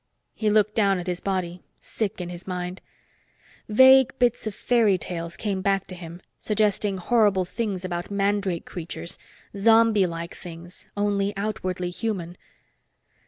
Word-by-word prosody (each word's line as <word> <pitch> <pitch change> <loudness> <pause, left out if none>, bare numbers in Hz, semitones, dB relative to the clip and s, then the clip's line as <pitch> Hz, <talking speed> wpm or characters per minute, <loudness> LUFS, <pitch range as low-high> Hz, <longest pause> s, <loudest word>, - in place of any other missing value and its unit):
He 215 - 0
looked 210 0 +3
down 200 -3 +3
at 175 - -5
his 180 -1 -2
body, 180 -2 -3 0.2
sick 215 -3 -3
in 175 -1 -4
his 175 +1 -9
mind. 180 0 -4 0.9
Vague 260 +3 +6
bits 245 -3 +1
of 210 - -4
fairy 225 -6 +3
tales 170 0 -5
came 200 -3 -2
back 195 0 +1
to 185 - -8
him, 175 0 -10 0.2
suggesting 210 -2 +1
horrible 200 -1 +2
things 200 -2 -3
about 175 -1 -4
mandrake 200 -3 0
creatures 170 +1 -7 0.4
zombie 220 -1 +5
like 170 0 -6
things, 170 +1 -10
only 205 -1 0
outwardly 185 -3 -3
human. 180 -4 -3
195 Hz, 140 wpm, -25 LUFS, 180-210 Hz, 0.9 s, Vague